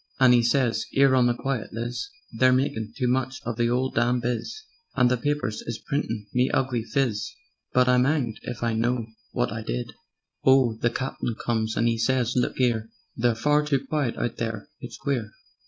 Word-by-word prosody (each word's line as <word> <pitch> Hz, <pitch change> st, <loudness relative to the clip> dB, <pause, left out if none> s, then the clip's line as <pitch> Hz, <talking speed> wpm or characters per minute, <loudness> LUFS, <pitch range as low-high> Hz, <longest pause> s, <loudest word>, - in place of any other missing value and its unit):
And 130 Hz, -2 st, +7 dB
'e -, -, +6 dB
whispers: 120 Hz, -2 st, +1 dB
"'Ere, 135 Hz, -1 st, +5 dB
on 125 Hz, -2 st, +4 dB
the 120 Hz, -, +1 dB
quiet, 135 Hz, -2 st, -3 dB
Liz, 120 Hz, -, -4 dB, 0.2 s
They're 130 Hz, 0 st, +4 dB
makin' 115 Hz, -4 st, 0 dB
too 125 Hz, -3 st, 0 dB
much 130 Hz, +1 st, 0 dB
of 120 Hz, -, -2 dB
the 120 Hz, +1 st, +1 dB
'ole 130 Hz, +2 st, +1 dB
damn 120 Hz, +2 st, +2 dB
biz, 120 Hz, -, -3 dB, 0.3 s
And 125 Hz, -2 st, +4 dB
the -, -, +4 dB
papers 145 Hz, -4 st, -1 dB
is 115 Hz, -, -3 dB
printin' 115 Hz, -7 st, -3 dB
me 125 Hz, +1 st, +3 dB
ugly 125 Hz, -3 st, 0 dB
phiz, 110 Hz, -3 st, -1 dB, 0.4 s
But... 125 Hz, 0 st, +3 dB
I'm 125 Hz, 0 st, +4 dB
'anged 135 Hz, -7 st, 0 dB
if 120 Hz, -1 st, -6 dB
I 115 Hz, -1 st, +1 dB
know 120 Hz, +1 st, 0 dB, 0.3 s
wot 125 Hz, -1 st, 0 dB
I 110 Hz, -, -4 dB
did. -, -, -4 dB, 0.5 s
"Oh, 130 Hz, -4 st, +5 dB
the 120 Hz, -, +3 dB
Captain 125 Hz, -2 st, -3 dB
comes 110 Hz, -2 st, 0 dB
and 115 Hz, -, +3 dB
'e 115 Hz, -1 st, +1 dB
says: 125 Hz, 0 st, +1 dB
'Look 125 Hz, +1 st, 0 dB
'ere! 115 Hz, -3 st, +1 dB, 0.3 s
They're 120 Hz, 0 st, +2 dB
far 150 Hz, +6 st, +2 dB
too 140 Hz, -2 st, 0 dB
quiet 140 Hz, -4 st, -1 dB
out 120 Hz, -, -2 dB
there: 115 Hz, +3 st, -4 dB
it's -, -, -8 dB
queer. 125 Hz, -7 st, -2 dB
125 Hz, 195 wpm, -25 LUFS, 115-130 Hz, 0.5 s, And